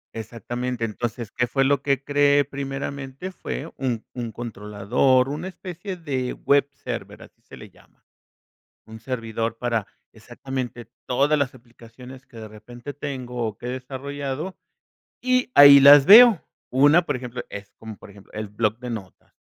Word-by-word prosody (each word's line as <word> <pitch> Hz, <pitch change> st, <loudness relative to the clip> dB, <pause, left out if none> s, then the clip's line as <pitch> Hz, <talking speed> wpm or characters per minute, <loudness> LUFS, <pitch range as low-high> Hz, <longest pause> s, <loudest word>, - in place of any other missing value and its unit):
Exactamente, 120 Hz, +2 st, -4 dB
entonces, 115 Hz, 0 st, -5 dB
¿qué 125 Hz, -, -1 dB
fue 135 Hz, +3 st, +1 dB
lo 140 Hz, 0 st, +2 dB
que 140 Hz, -1 st, 0 dB
creé? 145 Hz, 0 st, +3 dB
Primeramente 140 Hz, +3 st, -6 dB
fue 165 Hz, -3 st, -7 dB
un 120 Hz, -4 st, -3 dB
un 120 Hz, -2 st, -5 dB
controlador, 115 Hz, +4 st, 0 dB
una 155 Hz, +6 st, -5 dB
especie 185 Hz, 0 st, -8 dB
de 135 Hz, -7 st, -3 dB
web 140 Hz, 0 st, +2 dB
server, -, -, -6 dB
así -, -, -20 dB
se -, -, -14 dB
le -, -, -13 dB
llama. -, -, -25 dB, 0.8 s
Un 110 Hz, 0 st, -11 dB
servidor 115 Hz, -2 st, -4 dB
para 115 Hz, -4 st, -1 dB, 0.3 s
exactamente 125 Hz, -3 st, -7 dB, 0.2 s
todas 140 Hz, +4 st, +1 dB
las 135 Hz, -3 st, -1 dB
aplicaciones 125 Hz, +1 st, -14 dB
que 115 Hz, -, -15 dB
de 110 Hz, -1 st, -8 dB
repente 120 Hz, +6 st, -11 dB
tengo, 130 Hz, -4 st, -5 dB
o 110 Hz, -3 st, -4 dB
que -, -, -9 dB
he -, -, -3 dB
desarrollado, 140 Hz, +5 st, -5 dB, 0.6 s
y 255 Hz, 0 st, +1 dB
ahí 140 Hz, -1 st, +10 dB
las 140 Hz, 0 st, +8 dB
veo. 225 Hz, -3 st, +9 dB, 0.3 s
1, 145 Hz, +7 st, +5 dB
por 140 Hz, -, -2 dB
ejemplo, 125 Hz, -1 st, -7 dB
es 100 Hz, 0 st, -9 dB
como, 110 Hz, -1 st, -9 dB
por -, -, -14 dB
ejemplo, 100 Hz, 0 st, -17 dB
el 105 Hz, -1 st, -5 dB
bloc 110 Hz, +1 st, -1 dB
de 125 Hz, 0 st, -8 dB
notas. 100 Hz, -5 st, -9 dB
130 Hz, 155 wpm, -23 LUFS, 115-140 Hz, 0.8 s, ahí